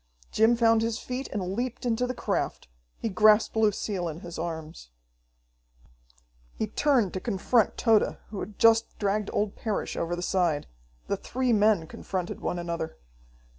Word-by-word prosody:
Jim 225 +2 +4
found 225 -1 +4
his 225 0 -1
feet 255 +3 -5
and 185 -2 -3
leaped 245 +3 -3
into 245 +1 +1
the 255 - -3
craft. - - -2 0.3
He - - -3
grasped 215 +2 +4
Lucille 210 -4 0
in 165 +1 -6
his 170 -1 -8
arms. 160 - -6 1.7
He - - -1
turned 235 -2 +1
to 185 - -2
confront 225 +2 +1
Tode, 225 -3 +3
who 205 - -5
had 210 - -7
just 225 0 +4
dragged 205 0 0
old 205 -1 -1
Parrish 215 -3 -3
over 170 +1 -2
the 175 - -5
side. 175 - +1 0.4
The - - -1
three 255 -1 -1
men 210 -5 +3
confronted 180 +2 -5
one 180 - -2
another. 170 - -4
210 Hz, 155 wpm, -27 LUFS, 180-230 Hz, 1.7 s, Jim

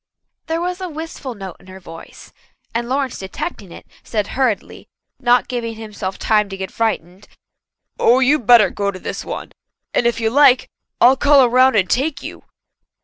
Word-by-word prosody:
There 325 +1 -1
was 360 +1 -3
a 370 - -4
wistful 305 -5 -7
note 195 -3 -8
in - - -20
her 190 0 -11
voice, 165 -2 -13 0.4
and 235 +1 -2
Lawrence 270 -1 -2
detecting 190 - -6
it, - - -12 0.2
said 210 -3 -2
hurriedly, 250 -6 -2 0.3
not 245 -1 +3
giving 230 -2 -4
himself 210 -3 -6
time 210 -2 +1
to 195 - -7
get 190 0 -6
frightened: 205 -4 -3 0.7
"Oh, 245 +3 +4
you'd 265 -3 +2
better 230 -6 +7
go 200 -1 -2
to 195 - -5
this - - -6
one. - - -7 0.4
And 235 - +2
if 235 - -1
you 220 -1 0
like, 275 -1 +4 0.3
I'll 255 +3 +6
call 280 -1 +5
around 255 +1 +4
and 190 -3 +3
take 275 - -1
you." - - -8
235 Hz, 175 wpm, -19 LUFS, 200-265 Hz, 0.7 s, better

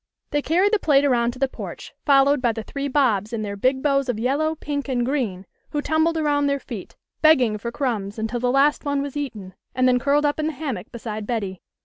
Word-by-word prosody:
They 290 - +1
carried 365 +8 +2
the 430 - +4
plate 285 -4 +3
around 240 -4 +2
to - - -12
the 270 +1 +1
porch, - - -8
fol 275 -1 +6
lowed 285 -1 +2
by 240 -2 +2
the 225 0 -5
three 280 +5 -4
Bobs 240 -7 +1
in 220 -2 -2
their 200 -1 -4
big 260 +6 +1
bows 275 -2 +2
of 240 - 0
yellow, 285 +7 0
pink, 290 -2 -4
and 245 -2 0
green, 235 -9 -2 0.2
who 295 - -2
tumbled 315 +1 +1
around 290 -2 +1
their 280 0 0
feet, - - -8 0.3
beg 315 0 +7
ging 220 -5 0
for 235 +3 -4
crumbs 225 -7 -2
until 225 +2 -2
the 250 +1 +1
last 275 +3 +3
one 285 -1 0
was 285 -1 -6
eaten, 215 -10 -5 0.2
and 255 0 +3
then 250 -1 +4
curled 290 +3 +2
up 290 +1 0
in 310 - 0
the 320 - -2
hammock 260 - -5
beside 220 -3 -6
Betty. 200 -6 -3
270 Hz, 240 wpm, -23 LUFS, 230-290 Hz, 0.3 s, beg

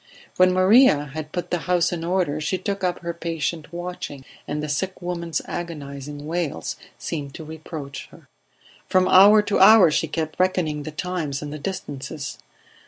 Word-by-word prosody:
When 185 0 +6
Maria 185 - +5
had 155 0 -6
put 175 - -4
the 175 - +1
house 180 -1 +3
in 170 -2 -3
order 170 -4 0
she 170 +5 -1
took 195 +1 -4
up 180 -1 +1
her 170 0 -3
patient 165 -1 -3
watching, 175 -6 -6 0.2
and 150 +1 -3
the - - -2
sick 185 +6 -2
woman's 170 -3 -3
agonizing 145 -4 -6
wails 160 - -3 0.2
seemed 145 -4 -5
to 160 - -7
reproach 155 -3 -8
her. - - -18 0.6
From 185 0 +3
hour 205 +3 +7
to 205 - 0
hour 195 -3 +8
she 160 +2 +1
kept 155 +1 -4
reckoning 180 -5 +1
the 155 - -6
times 150 -4 -3
and 145 0 -6
the 150 - -6
distances. 145 -4 -6
165 Hz, 170 wpm, -23 LUFS, 150-180 Hz, 0.6 s, hour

